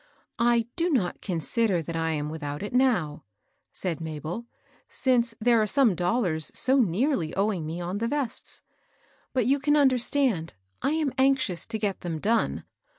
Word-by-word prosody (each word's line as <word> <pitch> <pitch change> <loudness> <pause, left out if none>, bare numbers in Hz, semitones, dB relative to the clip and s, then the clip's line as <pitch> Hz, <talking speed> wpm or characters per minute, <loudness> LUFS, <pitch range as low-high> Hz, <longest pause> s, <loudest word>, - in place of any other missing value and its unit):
" - - -58
I 235 -1 +3
do 345 +1 +1
not 235 - 0
consider 185 +1 0
that 165 +1 -5
I 165 0 0
am 150 -1 -2
without 145 0 -5
it 205 - -5
now," 180 - +1 0.5
said 170 -3 -3
Mabel, 160 +5 -5
^^ - - -22 0.4
since 240 -3 +1
there 235 0 +4
are 215 - +1
some 255 -2 +4
dollars 175 -3 0
so 265 +1 +2
nearly 205 - +1
owing 195 -5 0
me 165 +2 -4
on 180 +3 -3
the 230 - 0
vests. 275 -3 -3 0.7
But 255 -4 +1
you 275 +4 +3
can 295 +2 +3
understand, 255 - +2 0.3
I - - +1
am 310 -4 0
anxious 265 -9 +2
to 225 - -3
get 205 -3 -2
them 170 -3 -3
done. 225 +8 0
215 Hz, 170 wpm, -26 LUFS, 165-255 Hz, 0.7 s, there